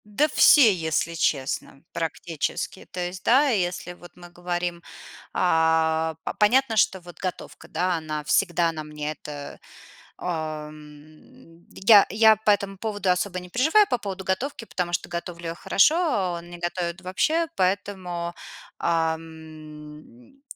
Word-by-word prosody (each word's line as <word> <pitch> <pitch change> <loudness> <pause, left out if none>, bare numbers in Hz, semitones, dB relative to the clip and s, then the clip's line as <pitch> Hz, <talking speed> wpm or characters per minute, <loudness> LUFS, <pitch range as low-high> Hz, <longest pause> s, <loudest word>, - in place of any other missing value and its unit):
Да 210 +9 +1
все, 270 -7 +6
если 160 -1 -1
честно. 140 -3 -2
Практически. 165 +2 -4
То 185 - -6
есть, 180 +1 -4
да, 275 +4 +4
если 180 -5 -1
вот 175 0 -15
мы 175 -1 -13
говорим, 175 0 -4 0.5
а, 160 -1 +2
п - - -3
понятно, 230 +3 +3
что 195 -2 +3
вот 175 0 -14
готовка, 185 -2 -6
да, 180 -1 0
она 155 -1 -5
всегда 170 +1 +2
на 155 -1 -6
мне. 150 0 -5
Это, 145 -2 -9 0.6
а, 155 -3 -4
м, 155 +2 -16
я 200 0 +6
я 220 +2 +5
по 215 0 +2
этому 200 -1 -1
поводу 205 -2 -2
особо 180 +1 0
не 180 0 -12
переживаю, 315 - +4
по 245 - +1
поводу 195 -3 -6
готовки, 230 +6 -2
потому 180 -5 -3
что 175 - -2
готовлю 170 0 -6
я 165 - -4
хорошо, 250 - +3
а 205 - 0
он 170 0 -13
не 175 - -9
готовит 175 0 -3
вообще, 310 - 0
поэтому, 185 -2 -2 0.4
а, 165 -1 +1
м, 155 - -13
175 Hz, 145 wpm, -24 LUFS, 160-200 Hz, 0.6 s, все